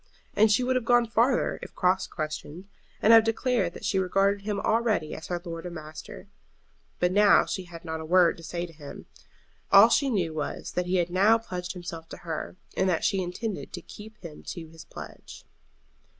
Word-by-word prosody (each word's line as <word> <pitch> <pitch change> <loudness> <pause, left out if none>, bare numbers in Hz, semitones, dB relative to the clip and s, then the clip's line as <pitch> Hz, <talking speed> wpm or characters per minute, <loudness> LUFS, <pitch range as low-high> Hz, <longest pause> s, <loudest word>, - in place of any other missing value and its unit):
And 215 +1 +5
she 230 +5 +3
would 255 +1 +1
have 255 - +1
gone 240 +1 +4
farther 235 +3 +1
if - - -10
cross 185 0 +1
questioned, 155 +3 -6 0.4
and 225 - +7
have 225 -1 +9
declared 225 -5 0
that - - -8
she 190 - +1
regarded 195 +2 +1
him 205 -2 -1
already 220 -9 +1
as 160 - -8
her 175 -1 -2
lord 165 -1 -6
and 175 - -8
master. 155 -1 -9 0.7
But 180 0 +1
now 205 +1 +5
she 190 - -4
had 170 -1 -11
not 160 -1 -4
a - - -7
word 175 0 +4
to 165 - -13
say 170 +2 -4
to 170 - -13
him. 145 -2 -10 0.7
All 200 +4 +9
she 275 +3 +2
knew 180 -9 0
was 155 -1 -4
that 180 0 -2
he 185 - 0
had 175 -1 +1
now 200 +5 +5
pledged 180 -5 -6
himself 170 -2 -8
to - - -8
her, 160 0 -4 0.2
and 190 - +2
that 170 - 0
she 195 - +1
intended 185 +4 -4
to - - -6
keep 215 +1 -12
him 160 -3 -9
to 170 -3 -6
his 160 -1 -13
pledge. - - -11
185 Hz, 205 wpm, -27 LUFS, 165-215 Hz, 0.7 s, have